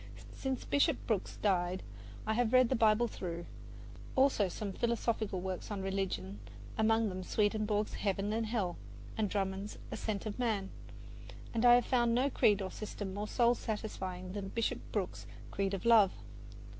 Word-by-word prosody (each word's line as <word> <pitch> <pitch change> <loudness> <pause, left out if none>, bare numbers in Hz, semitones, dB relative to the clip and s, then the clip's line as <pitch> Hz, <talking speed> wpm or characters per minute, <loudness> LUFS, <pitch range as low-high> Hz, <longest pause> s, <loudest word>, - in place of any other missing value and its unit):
Since 265 -1 -3
Bishop 285 0 +3
Brooks 210 -5 -1
died 185 -2 +1 0.4
I 220 - +1
have 240 +1 +1
read 255 -2 +6
the 260 - +2
Bible 225 +1 +4
through; 175 -5 -5 0.7
also 260 -7 +4
some 195 +2 -4
philosophical 230 -4 -1
works 185 -1 -4
on 200 -2 -3
religion, 195 0 -2 0.4
among 225 0 +3
them 185 0 -5
Swedenborg's 210 +2 0
"Heaven 200 +1 -1
and 225 0 0
Hell" 205 -6 -1 0.4
and 215 -2 0
Drummond's 195 +1 -2
"Ascent 210 -1 -3
of 215 +2 -4
Man," 215 -6 0 0.8
and 230 +1 +1
I 240 - +9
have 245 - +3
found 240 -2 +2
no 265 +3 +2
creed 205 -4 +3
or 190 - -4
system 205 -2 -5
more 205 +2 -3
soul 240 +1 +3
satisfying 190 -5 -4
than 200 -1 -4
Bishop 230 +3 -1
Brooks's 195 -4 -3 0.2
creed 195 0 0
of 190 - -7
love. 220 -5 +7
210 Hz, 155 wpm, -33 LUFS, 195-230 Hz, 0.8 s, I